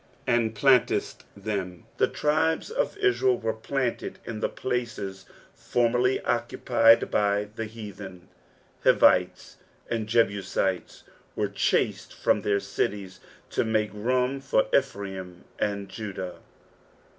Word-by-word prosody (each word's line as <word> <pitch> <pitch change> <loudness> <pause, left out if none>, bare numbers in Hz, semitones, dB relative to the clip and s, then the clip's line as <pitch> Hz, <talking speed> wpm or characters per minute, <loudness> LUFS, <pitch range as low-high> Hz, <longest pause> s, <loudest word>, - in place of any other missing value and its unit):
"And 115 -2 +1
planttdtt 130 +1 +3 0.2
them." 95 -4 -4
The - - +3
tribe* 160 +2 +1
of - - -1
In«el 390 - +2
were 110 -1 -2
planted 125 +2 -3
in 115 -2 -5
the - - 0
places 110 -7 -4 0.3
formerly 125 +2 +1
occupied 115 0 +3
by 105 0 +2
the 110 - -3
heathen. 100 -4 -9 0.6
Hivites - - +3 0.3
and 115 -2 -1
Jebusitea 100 -4 0 0.3
were - - 0
chased - - 0
from - - +2
their 100 -1 +1
cities 100 -1 -3 0.3
to - - +1
make 110 -2 0
room 125 +5 0
for 135 -5 +2
Ephraim 95 -8 -2 0.2
and 100 -1 -1
Jndsh. 95 -3 -6
110 Hz, 110 wpm, -26 LUFS, 100-125 Hz, 0.6 s, planttdtt